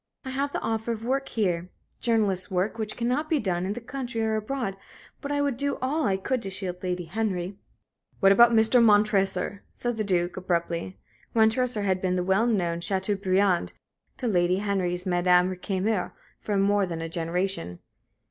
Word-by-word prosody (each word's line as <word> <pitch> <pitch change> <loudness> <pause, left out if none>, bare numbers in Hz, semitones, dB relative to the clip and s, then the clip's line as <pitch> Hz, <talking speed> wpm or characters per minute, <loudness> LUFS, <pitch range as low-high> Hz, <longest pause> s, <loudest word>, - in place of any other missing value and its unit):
I 260 - -4
have 280 +2 -1
the - - -2
offer 225 +1 -1
of 225 0 -7
work 270 +2 -1
here 180 -5 -1 0.3
journalist's 210 -6 +1
work 190 +5 -1
which 215 -1 -3
cannot 255 +6 -1
be 320 - +3
done 185 -6 -1
in 200 - -1
the 240 - -5
country 245 -2 -4
or 220 0 +1
abroad. 215 -2 -3 0.5
But 285 - -4
I 285 0 +1
would 280 -4 -1
do 280 +1 -1
all 290 +5 0
I 190 -1 +1
could 250 +6 -1
to 195 - -4
shield 185 -2 -5
Lady 180 -1 -2
Henry." 190 0 -3 0.6
"What 195 -2 +6
about 235 +4 +7
Mr. 230 +2 +5
Montresor?" 205 -2 +2
said 240 -2 -3
the 215 - 0
Duke, 180 -3 0
abruptly. 170 0 -2 0.4
Montresor 225 0 +2
had 190 -2 0
been 185 -1 0
the 180 - 0
well 190 +5 +2
known 175 -7 0
Châteaubriand 190 0 +1 0.4
to 250 - -2
Lady 180 -3 +2
Henry's 190 -3 -1
Madame 180 0 +3
Récamier 190 +1 -2 0.3
for 205 -2 -2
more 200 0 +2
than 165 -2 -4
a - - -3
generation. 165 - -2
200 Hz, 175 wpm, -26 LUFS, 180-230 Hz, 0.6 s, about